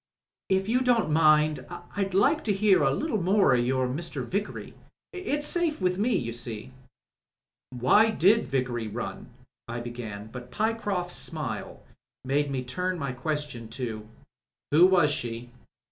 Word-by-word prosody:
If 190 Hz, 0 st, +1 dB
you 245 Hz, +3 st, +2 dB
don't 240 Hz, -9 st, +2 dB
mind 155 Hz, -1 st, +4 dB, 0.3 s
I'd 195 Hz, -2 st, -1 dB
like 285 Hz, +11 st, +3 dB
to 210 Hz, -, +2 dB
hear 195 Hz, -2 st, +4 dB
a 135 Hz, -, +4 dB
little 250 Hz, -, -1 dB
more 195 Hz, 0 st, +4 dB
o' -, -, +5 dB
your 130 Hz, +1 st, +1 dB
Mr. 145 Hz, 0 st, -4 dB
Vickery. 200 Hz, +9 st, -4 dB, 0.4 s
It's 295 Hz, -6 st, -2 dB
safe 335 Hz, -1 st, +1 dB
with 180 Hz, 0 st, 0 dB
me, 235 Hz, +4 st, +2 dB
you 115 Hz, -1 st, -3 dB
see." 120 Hz, +1 st, -7 dB, 1.0 s
"Why 130 Hz, -, +4 dB
did 220 Hz, +2 st, +3 dB
Vickery 125 Hz, -4 st, -1 dB
run," 120 Hz, +3 st, -6 dB, 0.4 s
I 120 Hz, +1 st, -4 dB
began, 110 Hz, -3 st, -7 dB
but 125 Hz, 0 st, -9 dB
Pyecroft's 205 Hz, -, -1 dB
smile 130 Hz, -10 st, -4 dB, 0.4 s
made 145 Hz, +2 st, +1 dB
me 130 Hz, -2 st, -2 dB
turn 180 Hz, +9 st, -2 dB
my 140 Hz, -4 st, -3 dB
question 145 Hz, -3 st, -4 dB
to 110 Hz, -4 st, -5 dB, 0.6 s
"Who 165 Hz, +5 st, +7 dB
was 175 Hz, -6 st, +4 dB
she?" 120 Hz, -4 st, -4 dB
150 Hz, 145 wpm, -27 LUFS, 125-200 Hz, 1.0 s, Who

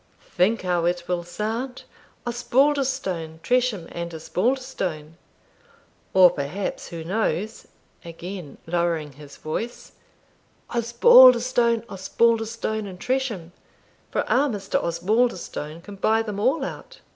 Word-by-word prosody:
Think 200 Hz, +5 st, +2 dB
how 175 Hz, -2 st, 0 dB
it 175 Hz, 0 st, -1 dB
will 175 Hz, -1 st, -1 dB
sound, 225 Hz, +8 st, -4 dB, 0.4 s
Osbaldistone, 240 Hz, -, 0 dB
Tresham, 245 Hz, -8 st, +1 dB
and 170 Hz, 0 st, -5 dB
Osbaldistone 180 Hz, -, -2 dB, 1.0 s
or 185 Hz, -2 st, +8 dB
perhaps, 165 Hz, +6 st, -4 dB
who 165 Hz, -1 st, -7 dB
knows" 205 Hz, +2 st, -2 dB, 0.4 s
(again 170 Hz, -2 st, -8 dB
lowering 165 Hz, -3 st, -1 dB
his 145 Hz, +1 st, -13 dB
voice), 225 Hz, +10 st, -5 dB, 0.8 s
"Osbaldistone, 235 Hz, 0 st, +6 dB
Osbaldistone, 225 Hz, +1 st, 0 dB
and 185 Hz, -2 st, -9 dB
Tresham, 245 Hz, -10 st, -2 dB, 0.6 s
for -, -, -1 dB
our 280 Hz, +3 st, +3 dB
Mr. 205 Hz, -5 st, -2 dB
Osbaldistone 170 Hz, -3 st, -1 dB
can 205 Hz, 0 st, -10 dB
buy 220 Hz, +3 st, +2 dB
them 210 Hz, -2 st, -5 dB
all 265 Hz, +6 st, +1 dB
out." -, -, -9 dB
200 Hz, 105 wpm, -24 LUFS, 170-240 Hz, 1.0 s, or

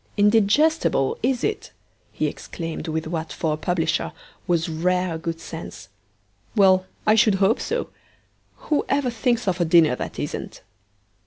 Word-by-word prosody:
'Indigestible, 210 Hz, -, +3 dB
is 250 Hz, +1 st, 0 dB
it?' 430 Hz, -, -2 dB, 0.4 s
he -, -, -2 dB
exclaimed 165 Hz, -1 st, -5 dB
with 160 Hz, 0 st, -2 dB
what, 160 Hz, 0 st, -4 dB
for 160 Hz, -2 st, -1 dB
a -, -, -3 dB
publisher, 165 Hz, -1 st, -1 dB, 0.3 s
was 170 Hz, -1 st, +1 dB
rare 180 Hz, +2 st, 0 dB
good 165 Hz, 0 st, -4 dB
sense. 100 Hz, -, -9 dB, 0.7 s
'Well, 190 Hz, -2 st, +4 dB, 0.2 s
I 215 Hz, -, +5 dB
should 220 Hz, -2 st, +4 dB
hope 195 Hz, +4 st, +2 dB
so; 470 Hz, +2 st, -2 dB, 0.8 s
who 295 Hz, -, +3 dB
ever 275 Hz, -3 st, +1 dB
thinks 235 Hz, 0 st, 0 dB
of 180 Hz, -1 st, 0 dB
a -, -, +5 dB
dinner 160 Hz, -5 st, +5 dB
that -, -, -6 dB
isn't?' -, -, -5 dB
185 Hz, 145 wpm, -23 LUFS, 165-225 Hz, 0.8 s, I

